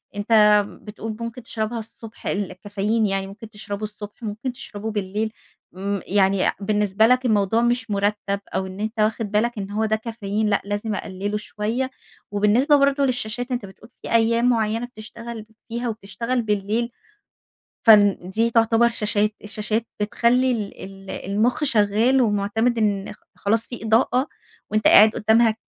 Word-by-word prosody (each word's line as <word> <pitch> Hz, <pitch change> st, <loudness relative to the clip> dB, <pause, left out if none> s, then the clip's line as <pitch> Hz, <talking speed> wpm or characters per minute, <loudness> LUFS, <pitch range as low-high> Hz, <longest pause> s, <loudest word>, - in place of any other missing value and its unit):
أنت 210 Hz, 0 st, +5 dB, 0.2 s
بتقول 215 Hz, +1 st, -7 dB
ممكن 230 Hz, +1 st, -6 dB
تشربها 225 Hz, 0 st, -3 dB
الصبح 225 Hz, 0 st, -10 dB
ال 200 Hz, -2 st, -1 dB
الكافيين 205 Hz, +3 st, -1 dB
يعني 195 Hz, -1 st, -1 dB
ممكن 210 Hz, +3 st, -11 dB
تشربه 205 Hz, -1 st, -7 dB
الصبح 210 Hz, +1 st, -8 dB
ممكن 220 Hz, +4 st, -3 dB
تشربه 220 Hz, -2 st, -7 dB
بالليل. 210 Hz, +1 st, -2 dB, 0.4 s
م 200 Hz, +2 st, -2 dB
يعني 195 Hz, -1 st, +2 dB, 0.2 s
بالنسبة 210 Hz, +1 st, +2 dB
لك 255 Hz, +1 st, +3 dB
الموضوع 215 Hz, -1 st, +2 dB
مش 240 Hz, -1 st, 0 dB
مُرتَّب 200 Hz, 0 st, 0 dB, 0.2 s
أو 190 Hz, -, 0 dB
إن 190 Hz, +1 st, -9 dB
أنت 220 Hz, +2 st, -4 dB
واخِد 215 Hz, 0 st, 0 dB
بالك 230 Hz, +2 st, +1 dB
إن 200 Hz, -1 st, -5 dB
هو 215 Hz, +2 st, 0 dB
ده 220 Hz, 0 st, +1 dB
كافيين 220 Hz, -2 st, -3 dB
لأ، 200 Hz, -, +2 dB
لازم 205 Hz, +1 st, -2 dB
أقلِّله 200 Hz, +2 st, -3 dB
شويّة. 220 Hz, +5 st, -3 dB, 0.4 s
وبالنسبة 210 Hz, +8 st, +3 dB
برضه 280 Hz, 0 st, +3 dB
للشاشات، 245 Hz, 0 st, -3 dB
أنت 245 Hz, -4 st, -2 dB
بتقول 195 Hz, +4 st, -15 dB
في -, -, -7 dB
أيّام 230 Hz, +1 st, +3 dB
معيّنة 225 Hz, 0 st, 0 dB
بتشتغل 230 Hz, -1 st, -9 dB, 0.2 s
فيها 235 Hz, +1 st, -3 dB
وبتشتغل 230 Hz, +3 st, -3 dB
بالليل، 215 Hz, +2 st, -1 dB, 1.0 s
فن 205 Hz, -3 st, +7 dB
دي 225 Hz, +4 st, +1 dB
تعتبر 230 Hz, 0 st, +4 dB
شاشات. 210 Hz, -2 st, 0 dB
الشاشات 215 Hz, +2 st, -2 dB
بتخلّي 240 Hz, +5 st, +2 dB
ال 215 Hz, -4 st, -3 dB
ال 195 Hz, 0 st, -11 dB
المُخ 220 Hz, +9 st, 0 dB
شغّال 225 Hz, +1 st, +3 dB
ومُعتمِد 220 Hz, +2 st, +1 dB
إن 205 Hz, -3 st, 0 dB, 0.2 s
خلاص 225 Hz, +3 st, 0 dB
في 240 Hz, -3 st, -7 dB
إضاءة 245 Hz, +5 st, +2 dB, 0.4 s
وأنت 215 Hz, 0 st, +1 dB
قاعد 215 Hz, +1 st, +8 dB
قدّامها 220 Hz, +1 st, +3 dB
215 Hz, 150 wpm, -23 LUFS, 205-230 Hz, 1.0 s, قاعد